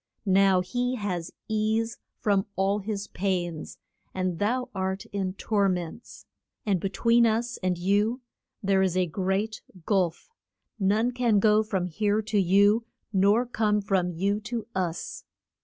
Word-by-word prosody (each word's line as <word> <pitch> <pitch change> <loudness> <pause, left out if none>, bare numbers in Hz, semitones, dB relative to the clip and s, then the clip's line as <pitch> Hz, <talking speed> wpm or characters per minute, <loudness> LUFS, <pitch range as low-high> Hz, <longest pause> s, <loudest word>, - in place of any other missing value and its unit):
Now 195 -1 +4
he 245 +7 -1
has 180 -7 -3 0.2
ease 220 +1 0 0.2
from 200 -2 +1
all 195 +2 +1
his 205 0 -4
pains 175 -5 -3 0.4
and 185 -2 -1
thou 250 +5 0
art 190 +1 -2
in 190 -2 -1
tor 200 -1 +1
ments. 180 +4 -5 0.4
And 200 -4 +2
be 195 - -2
tween 235 +3 +4
us 230 +2 -1
and 185 -1 0
you 205 +7 +1 0.4
there 195 -1 +3
is 185 -1 +1
a 185 - +3
great 190 +5 -2 0.2
gulf; 185 - 0 0.5
none 215 +5 +2
can 240 -4 +2
go 210 +1 +5
from 195 -4 -1
here 205 +4 0
to 210 -1 0
you, 200 +4 +4 0.3
nor 200 +5 +4
come 215 -3 +1
from 195 -3 0
you 195 +4 0
to 220 0 -4
us. 185 - -3
200 Hz, 145 wpm, -27 LUFS, 190-220 Hz, 0.5 s, go